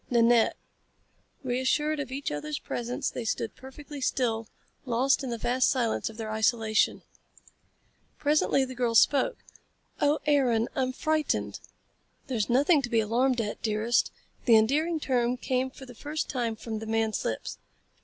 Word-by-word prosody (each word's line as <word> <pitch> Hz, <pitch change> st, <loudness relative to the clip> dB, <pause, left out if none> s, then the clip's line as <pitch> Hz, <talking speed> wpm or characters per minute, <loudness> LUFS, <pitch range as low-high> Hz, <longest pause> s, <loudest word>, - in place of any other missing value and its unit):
"Nanette." 235 Hz, -1 st, +4 dB, 0.9 s
Reassured 260 Hz, +4 st, 0 dB
of 275 Hz, -3 st, -4 dB
each 275 Hz, +2 st, -3 dB
other's 150 Hz, 0 st, -3 dB
presence 245 Hz, +1 st, -3 dB
they 245 Hz, -, -5 dB
stood 225 Hz, 0 st, -2 dB
perfectly 280 Hz, +2 st, -10 dB
still, 230 Hz, -4 st, 0 dB, 0.4 s
lost 260 Hz, +3 st, +1 dB
in 260 Hz, -, -3 dB
the 235 Hz, -, -3 dB
vast 250 Hz, +3 st, +2 dB
silence 235 Hz, -4 st, 0 dB
of 220 Hz, -, -12 dB
their 220 Hz, -2 st, -4 dB
isolation. 220 Hz, 0 st, +1 dB, 1.1 s
Presently 290 Hz, -2 st, +2 dB
the 260 Hz, -, -8 dB
girl 240 Hz, -2 st, -1 dB
spoke. 290 Hz, -, +4 dB, 0.6 s
"Oh, 290 Hz, +1 st, +3 dB
Aaron, 255 Hz, -6 st, +3 dB
I'm 260 Hz, -1 st, 0 dB
frightened!" 310 Hz, +3 st, -1 dB, 0.7 s
"There's 240 Hz, -6 st, -2 dB
nothing 285 Hz, +5 st, +4 dB
to 250 Hz, -, -4 dB
be 230 Hz, -2 st, +2 dB
alarmed 240 Hz, +3 st, +1 dB
at, 210 Hz, -2 st, -5 dB
dearest." 220 Hz, +2 st, +1 dB, 0.4 s
The 235 Hz, -, +6 dB
endearing 300 Hz, +9 st, +2 dB
term 250 Hz, -3 st, 0 dB
came 255 Hz, +1 st, -1 dB
for 265 Hz, 0 st, -12 dB
the 250 Hz, -, -11 dB
first 300 Hz, +6 st, -4 dB
time 235 Hz, -4 st, -1 dB
from 220 Hz, 0 st, -5 dB
the 220 Hz, -, -7 dB
man's 220 Hz, -1 st, 0 dB
lips. 110 Hz, -, -4 dB
245 Hz, 150 wpm, -28 LUFS, 225-275 Hz, 1.1 s, The